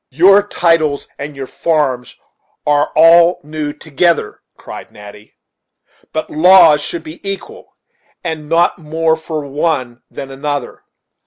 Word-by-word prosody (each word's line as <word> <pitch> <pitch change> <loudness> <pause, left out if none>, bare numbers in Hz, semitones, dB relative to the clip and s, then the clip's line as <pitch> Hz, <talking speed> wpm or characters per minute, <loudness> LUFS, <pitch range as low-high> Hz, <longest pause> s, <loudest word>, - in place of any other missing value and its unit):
"Your 190 +8 +5
titles 165 -7 0
and 145 +1 -7
your 135 -1 -6
farms 135 -5 -2 0.5
are 145 0 +1
all 170 +2 +5
new 150 0 -5
together," 160 +3 -1 0.2
cried - - -10
Natty; 105 0 -14 0.7
"but 155 - -4
laws 160 -2 +6
should 165 +2 -5
be 160 +1 -10
equal, 205 - -8 0.5
and 160 -3 -5
not 170 +2 +2
more 160 +1 0
for 160 -2 -6
one 135 -4 -2
than 135 - -8
another. 145 +1 -5
155 Hz, 125 wpm, -15 LUFS, 145-170 Hz, 0.7 s, laws